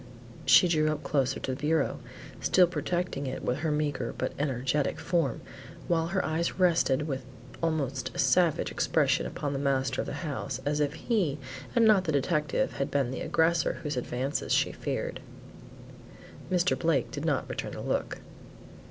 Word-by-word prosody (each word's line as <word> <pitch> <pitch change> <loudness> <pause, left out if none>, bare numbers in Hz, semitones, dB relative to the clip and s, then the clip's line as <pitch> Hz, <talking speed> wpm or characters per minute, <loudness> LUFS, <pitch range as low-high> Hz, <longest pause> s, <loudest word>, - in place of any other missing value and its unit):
She 130 +7 +7
drew 155 -2 +2
up 155 0 -4
closer 135 -2 0
to 130 - -2
the 130 - -7
bureau, 155 -1 +1 0.4
still 185 - +5
protecting 175 -4 -2
it 130 - -5
with 125 +3 -1
her 160 +1 -1
meagre 145 -5 -1
but - - -2
energetic 135 0 0
form 165 -8 0 0.5
while 165 -1 +1
her 190 +2 0
eyes 165 +2 -1
rested 165 -6 +3
with 135 -3 -3 0.4
almost 140 -6 -1
a - - -6
savage 175 -4 +3
expression - - +1
upon 145 -1 -3
the 135 - -2
master 135 -2 0
of - - -6
the - - -4
house 140 -3 -3
as 145 +1 0
if 150 +1 0
he, 180 - 0 0.4
and 235 -1 +5
not 205 -4 +5
the 160 - 0
detective, 150 0 0
had 140 - -1
been 135 -3 0
the 130 - -4
aggressor 165 -1 +2
whose 150 -2 -2
advances 130 +3 -2
she - - +3
feared. - - -3 1.3
Mr. 180 0 +3
Blake 160 -7 +1
did - - -5
not - - 0
return - - -5
the - - -6
look. - - -2
150 Hz, 170 wpm, -29 LUFS, 135-170 Hz, 1.3 s, She